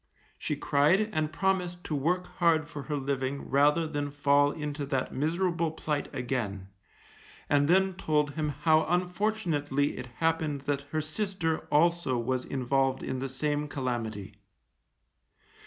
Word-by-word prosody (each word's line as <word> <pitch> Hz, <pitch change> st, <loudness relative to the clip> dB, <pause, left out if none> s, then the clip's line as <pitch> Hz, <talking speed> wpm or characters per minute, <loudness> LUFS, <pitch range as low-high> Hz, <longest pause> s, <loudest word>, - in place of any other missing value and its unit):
She -, -, -2 dB
cried 180 Hz, +10 st, +2 dB
and 155 Hz, -1 st, 0 dB
promised 180 Hz, 0 st, -1 dB
to -, -, -4 dB
work 175 Hz, +6 st, +1 dB
hard 165 Hz, -3 st, +3 dB
for 150 Hz, -2 st, -7 dB
her 150 Hz, +2 st, -3 dB
living 140 Hz, 0 st, -2 dB
rather 150 Hz, +4 st, +4 dB
than 145 Hz, -2 st, -2 dB
fall 145 Hz, 0 st, +3 dB
into 150 Hz, -1 st, -4 dB
that 135 Hz, -3 st, -1 dB
miserable 170 Hz, +3 st, 0 dB
plight 155 Hz, -2 st, -3 dB
again, 120 Hz, -7 st, -3 dB, 0.8 s
and 145 Hz, 0 st, +3 dB
then 190 Hz, +3 st, +4 dB
told 150 Hz, -5 st, 0 dB
him 150 Hz, +1 st, -2 dB
how 160 Hz, -1 st, +5 dB
unfortunately 175 Hz, -6 st, 0 dB
it 125 Hz, -, -6 dB
happened 160 Hz, -3 st, 0 dB
that 140 Hz, 0 st, -2 dB
her 155 Hz, +1 st, -1 dB
sister 165 Hz, 0 st, -2 dB
also 170 Hz, -4 st, +3 dB
was 125 Hz, +2 st, -1 dB
involved 135 Hz, 0 st, 0 dB
in 130 Hz, -, -3 dB
the 135 Hz, +1 st, -3 dB
same 145 Hz, +2 st, -1 dB
calamity. 120 Hz, -8 st, -3 dB
150 Hz, 140 wpm, -29 LUFS, 135-165 Hz, 0.8 s, how